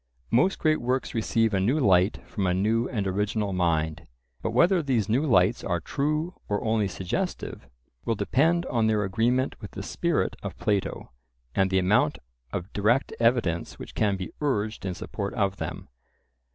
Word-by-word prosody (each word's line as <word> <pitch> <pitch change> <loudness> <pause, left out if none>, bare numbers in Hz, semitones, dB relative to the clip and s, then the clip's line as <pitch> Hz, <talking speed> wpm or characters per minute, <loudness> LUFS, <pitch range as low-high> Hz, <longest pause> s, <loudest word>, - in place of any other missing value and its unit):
Most 185 +11 +3
great 155 -1 +2
works 130 +2 -1
receive 115 -1 +1
a 95 - +2
new 120 +11 +2
light 95 -4 +3
from 100 -3 -2
a 90 - +2
new 110 +5 +1
and 105 -6 -2
original 105 +1 -1
mind. 80 -3 0 0.3
But - - -1
whether 170 - +4
these 125 -9 0
new 120 +6 +2
lights 100 -1 +3
are 85 -2 0
true 150 - -1 0.2
or 105 0 0
only 110 -2 +1
suggestive, 90 -7 -4 0.3
will 115 - 0
depend 160 - +2
on 115 -3 +1
their 105 -1 +2
agreement 120 +7 0
with - - -7
the - - -7
spirit - - 0
of - - -6
Plato, 100 -9 -1 0.4
and 95 0 +2
the 95 - +2
amount 95 +3 +3 0.3
of 90 +2 -5
direct 115 +7 +2
evidence 115 -8 +1
which - - -9
can 100 -3 +1
be 90 -3 -6
urged 110 -8 -1
in 90 - -3
support 100 +2 -5
of 100 -2 0
them. - - -5
105 Hz, 170 wpm, -26 LUFS, 95-125 Hz, 0.4 s, whether